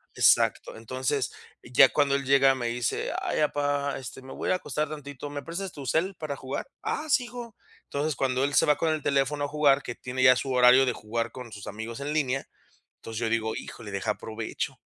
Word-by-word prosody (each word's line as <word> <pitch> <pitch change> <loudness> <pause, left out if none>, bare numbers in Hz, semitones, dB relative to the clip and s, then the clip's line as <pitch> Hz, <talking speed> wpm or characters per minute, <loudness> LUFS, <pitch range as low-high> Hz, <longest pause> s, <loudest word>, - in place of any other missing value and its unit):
Exacto. - - +3
Entonces, 130 +2 -2 0.3
ya 125 +2 +6
cuando 140 -2 +2
él 140 - -1
llega, 135 0 +5
me 120 -2 -2
dice: 120 0 -1
"Ay, - - -1
papá, 145 -1 0
este, 130 0 -8
me 130 0 -11
voy - - -2
a - - +4
acostar 155 -4 -2
tantito, 145 -2 -7
¿me 145 0 -6
prestas 180 +2 -5
tu 140 - -8
cel 185 +8 0
para 150 -4 -5
jugar?". 130 +1 -4 0.2
"Ah, 310 - -2
sí, 275 -4 +3
hijo". 240 -2 -9 0.3
Entonces, 145 +1 -1
cuando 130 0 +1
él 145 - -2
se - - +5
va 150 - +3
con 165 - 0
el 155 -2 -3
teléfono 140 +1 +1
a - - 0
jugar, 145 -2 +3
que 120 - -5
tiene 130 +1 -3
ya 130 -1 +7
su 130 +1 -2
horario 125 +1 +7
de 125 - +1
jugar 115 +2 -3
con 125 -3 -9
sus 100 -2 -9
amigos 110 +3 -6
en 145 +2 -3
línea, 135 -3 0 0.5
entonces, 115 -1 -7
yo 115 -1 -1
digo: 110 -1 0
"Híjole, 105 -3 -8
deja, 100 +2 -2
aprovecho". 110 +1 -4
135 Hz, 215 wpm, -27 LUFS, 120-145 Hz, 0.5 s, ya